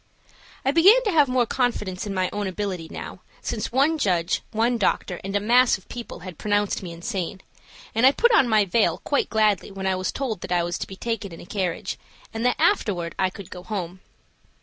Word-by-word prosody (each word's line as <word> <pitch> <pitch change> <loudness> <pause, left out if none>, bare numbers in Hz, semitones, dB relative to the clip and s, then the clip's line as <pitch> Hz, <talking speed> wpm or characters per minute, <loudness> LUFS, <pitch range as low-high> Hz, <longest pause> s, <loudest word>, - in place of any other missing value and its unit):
I 270 - +3
began 390 - +6
to 420 - +1
have 300 -5 +5
more 250 -1 +2
confidence 215 -6 -1
in 200 - -3
my 185 0 +1
own 205 -1 -2
ability 185 -3 -4
now, - - -8 0.2
since 215 -3 -4
one 285 +6 +2
judge, 175 - +1
one 230 +2 +1
doctor, 185 -3 0
and 195 +1 -4
a - - +3
mass 240 +4 +4
of - - -21
people 240 -7 -8
had 180 -3 -9
pronounced 205 -1 0
me 180 -3 -7
insane, 190 +1 -4 0.5
and 225 - +1
I 265 - +8
put 480 +11 +3
on 270 - +5
my 215 -2 +4
veil 210 +4 +2
quite 285 - 0
gladly 215 -3 +2
when 195 -1 -6
I 190 0 +2
was 185 0 -2
told 230 -9 -3
that - - -7
I 175 -1 +2
was 175 0 -3
to - - -4
be 190 - -9
taken 220 -2 -4
in 165 - -10
a - - -11
carriage, 185 -3 -3 0.3
and 225 +1 -3
that 250 - +2
afterward 205 - +1
I 185 - +3
could 195 0 -11
go 180 - -8
home. 185 -3 -5
205 Hz, 215 wpm, -24 LUFS, 185-245 Hz, 0.5 s, I